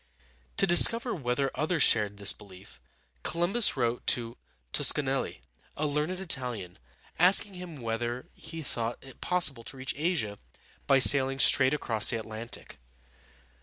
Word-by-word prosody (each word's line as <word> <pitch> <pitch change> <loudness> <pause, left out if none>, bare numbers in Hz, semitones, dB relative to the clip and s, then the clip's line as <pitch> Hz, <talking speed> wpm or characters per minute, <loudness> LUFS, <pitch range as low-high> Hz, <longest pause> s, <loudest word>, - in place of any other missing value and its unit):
To - - +3
discover 230 +7 +5
whether 135 -3 -3
others 155 +3 -1
shared 105 -2 +2
this 100 0 +5
belief, 100 -2 -17 0.4
Columbus 175 +4 +1
wrote 120 -1 -3
to 115 -1 -1 0.4
Tos - - +4
ca - - -3
nel´li, - - -4 0.4
a 155 - -3
learned 150 +5 -3
Italian, 125 - -2 0.4
asking 190 +3 +5
him 180 -3 -10
whether 120 +1 -5
he 165 -1 -10
thought 120 -3 -4
it 135 -1 -16
possible 160 -10 +3
to 135 - -10
reach 130 0 -4
Asia 145 - -3 0.5
by 135 - +4
sailing 135 0 +4
straight 135 +1 +3
across 110 -7 +2
the 120 - +1
Atlantic. 110 +1 -7
130 Hz, 140 wpm, -27 LUFS, 115-165 Hz, 0.5 s, discover